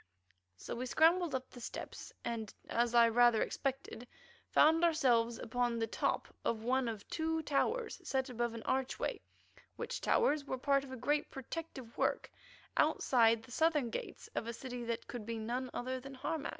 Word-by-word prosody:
So -, -, -6 dB
we 255 Hz, +2 st, -3 dB
scrambled 330 Hz, +2 st, +4 dB
up 260 Hz, 0 st, -4 dB
the 245 Hz, -, -11 dB
steps, -, -, -7 dB
and, 225 Hz, -3 st, -3 dB, 0.2 s
as 240 Hz, 0 st, +1 dB
I 235 Hz, -1 st, +8 dB
rather 240 Hz, 0 st, +5 dB
expected, 265 Hz, -3 st, -4 dB, 0.4 s
found 320 Hz, +2 st, +5 dB
ourselves 240 Hz, -8 st, +3 dB
upon 240 Hz, +1 st, -1 dB
the 225 Hz, -, +1 dB
top 225 Hz, -, -1 dB, 0.2 s
of 225 Hz, -1 st, -1 dB
one 255 Hz, +1 st, +1 dB
of 220 Hz, -3 st, -5 dB
two 320 Hz, 0 st, -1 dB
towers 445 Hz, -, 0 dB
set 265 Hz, 0 st, 0 dB
above 240 Hz, -2 st, -2 dB
an 225 Hz, -, -7 dB
archway, 265 Hz, -, -1 dB, 0.5 s
which -, -, -4 dB
towers 305 Hz, -11 st, +3 dB
were 265 Hz, -2 st, -3 dB
part 275 Hz, +1 st, +2 dB
of 270 Hz, -, -10 dB
a -, -, -4 dB
great 295 Hz, +5 st, 0 dB
protective 270 Hz, -3 st, -7 dB
work -, -, 0 dB, 0.5 s
outside 230 Hz, -3 st, +4 dB
the 245 Hz, -, -14 dB
southern 300 Hz, -4 st, +2 dB
gates -, -, -6 dB
of 230 Hz, -, -2 dB
a 235 Hz, -, -3 dB
city 245 Hz, 0 st, -6 dB
that 230 Hz, 0 st, -3 dB
could 240 Hz, -3 st, -6 dB
be 230 Hz, +1 st, -4 dB
none 245 Hz, +4 st, -3 dB
other 255 Hz, +1 st, -3 dB
than 270 Hz, +1 st, -9 dB
Harmac. 300 Hz, +3 st, -3 dB
255 Hz, 175 wpm, -35 LUFS, 235-285 Hz, 0.5 s, I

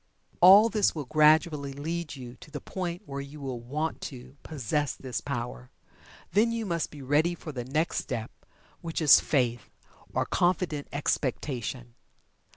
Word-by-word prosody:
All 195 Hz, +5 st, +9 dB
this 215 Hz, -5 st, +2 dB
will 150 Hz, -3 st, -4 dB
gradually 155 Hz, -1 st, +3 dB
lead 160 Hz, +3 st, -4 dB
you 125 Hz, -2 st, -9 dB
to -, -, -14 dB
the 150 Hz, -1 st, -6 dB
point 180 Hz, +3 st, -5 dB
where 140 Hz, -2 st, -5 dB
you 140 Hz, +2 st, -10 dB
will 130 Hz, -4 st, -4 dB
"want 150 Hz, +7 st, -3 dB
to" 130 Hz, 0 st, -12 dB
possess 145 Hz, -1 st, -2 dB
this 130 Hz, -2 st, -5 dB
power. 120 Hz, -, -5 dB, 0.6 s
Then 215 Hz, +5 st, +3 dB
you 230 Hz, -1 st, -2 dB
must 170 Hz, -4 st, -1 dB
be 145 Hz, -2 st, -10 dB
ready 150 Hz, +6 st, +2 dB
for 160 Hz, -, -8 dB
the 125 Hz, -4 st, -5 dB
next 155 Hz, +6 st, 0 dB
step 115 Hz, -3 st, -4 dB, 0.5 s
which 165 Hz, -1 st, -3 dB
is 155 Hz, -4 st, +8 dB
"Faith" 120 Hz, -6 st, 0 dB, 0.4 s
or -, -, 0 dB
"Confident 175 Hz, -5 st, 0 dB
Expectation." 130 Hz, -4 st, -2 dB
145 Hz, 155 wpm, -28 LUFS, 130-165 Hz, 0.6 s, All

